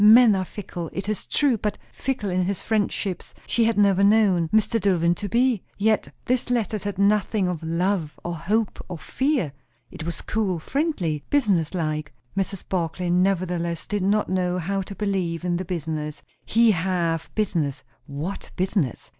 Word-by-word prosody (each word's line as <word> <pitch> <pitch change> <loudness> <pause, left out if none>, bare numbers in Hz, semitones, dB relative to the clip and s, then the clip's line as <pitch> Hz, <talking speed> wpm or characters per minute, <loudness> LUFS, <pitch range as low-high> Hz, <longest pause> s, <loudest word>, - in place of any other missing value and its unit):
Men 225 +1 +8
are 185 -1 -1
fickle, 175 -4 -6
it 195 +1 -4
is 215 -1 -3
true; 270 -7 +2
but 210 0 -2 0.2
fickle 250 -7 -2
in 180 0 +1
his 195 +1 -1
friendships 205 -3 -2
she 235 - +2
had 225 -2 +1
never 200 -1 +4
known 200 -5 +4
Mr. 220 +2 +2
Dillwyn 175 -3 +3
to 205 - -4
be. 240 -2 +2 0.2
Yet 215 +1 +1
this 255 0 0
letter 225 -3 0
said 205 -1 -4
nothing 200 0 +2
of 180 -3 -2
love, 165 0 -1
or 175 - -3
hope, 210 +7 -1
or 175 - -4
fear; 260 - 0 0.4
it - - -7
was 170 +1 -4
cool, 205 -5 0
friendly, 180 - -1
business 195 - +2
like. 155 -3 -2 0.2
Mrs. 195 -1 -2
Barclay 175 0 -1
nevertheless 180 -2 +1
did 205 -1 -2
not 205 +3 +2
know 180 -1 0
how 195 +3 -1
to 195 +1 -7
believe 185 -4 -1
in 175 -1 +1
the 185 - -4
business. 155 -3 -4 0.2
He 230 0 +5
have 170 -3 0
business! 160 -11 0 0.2
What 155 +7 -5
business? 185 - -1
190 Hz, 165 wpm, -24 LUFS, 170-210 Hz, 0.4 s, Men